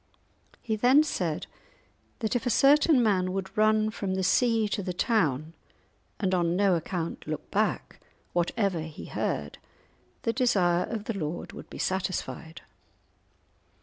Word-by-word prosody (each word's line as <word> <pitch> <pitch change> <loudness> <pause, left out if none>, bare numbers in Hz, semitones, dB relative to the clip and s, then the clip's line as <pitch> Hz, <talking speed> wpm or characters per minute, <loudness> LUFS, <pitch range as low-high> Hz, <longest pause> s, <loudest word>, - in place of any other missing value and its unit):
He 220 -2 -1
then 255 +7 +5
said 175 - -2 0.8
that 220 +1 -1
if 245 0 -1
a - - +3
certain 280 +2 +5
man 185 -4 +1
would 195 +1 -4
run 215 0 +3
from 195 -3 -3
the 190 - -1
sea 225 +3 +3
to 205 - -1
the 180 -1 -3
town, 160 - 0 0.7
and 190 -2 0
on 175 -1 +1
no 195 0 +3
account 170 -1 -3
look 155 0 -5
back, - - -1 0.3
whatever 180 +1 0
he 160 -1 -8
heard, 70 +1 -3 0.6
the 230 - 0
desire 185 -8 +2
of 220 -2 -4
the 230 - -3
lord 160 -2 -4
would - - -10
be - - -9
satisfied. 185 -3 -3
195 Hz, 145 wpm, -28 LUFS, 175-225 Hz, 0.8 s, then